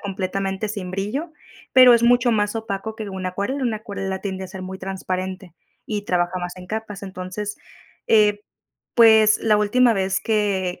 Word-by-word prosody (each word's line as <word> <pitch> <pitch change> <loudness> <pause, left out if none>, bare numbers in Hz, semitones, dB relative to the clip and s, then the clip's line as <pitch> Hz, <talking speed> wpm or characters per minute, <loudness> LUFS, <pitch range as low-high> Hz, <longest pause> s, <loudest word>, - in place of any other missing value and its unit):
completamente 195 +1 -3
sin 200 -4 -5
brillo, 210 - -3 0.4
pero 255 -1 +9
es 235 - +4
mucho 245 0 +4
más 210 0 0
opaco 220 0 -5
que 215 -3 -6
una 185 -1 -4
acuarela, 200 +9 -3
una 230 -3 0
acuarela 195 -3 -5
tiende 190 -1 -4
a - - -6
ser 185 0 -9
muy 190 +1 -7
transparente 185 -1 -5 0.3
y 210 -2 -3
trabaja 175 0 0
más 175 +1 -5
en 180 0 -10
capas, 210 -1 -5
entonces, 190 +2 -6 0.5
eh, 210 -2 +4 0.5
pues, 220 -2 +6
la 215 -2 +2
última 235 +4 +3
vez 190 -1 0
que 195 -5 -1
200 Hz, 165 wpm, -22 LUFS, 190-220 Hz, 0.5 s, pero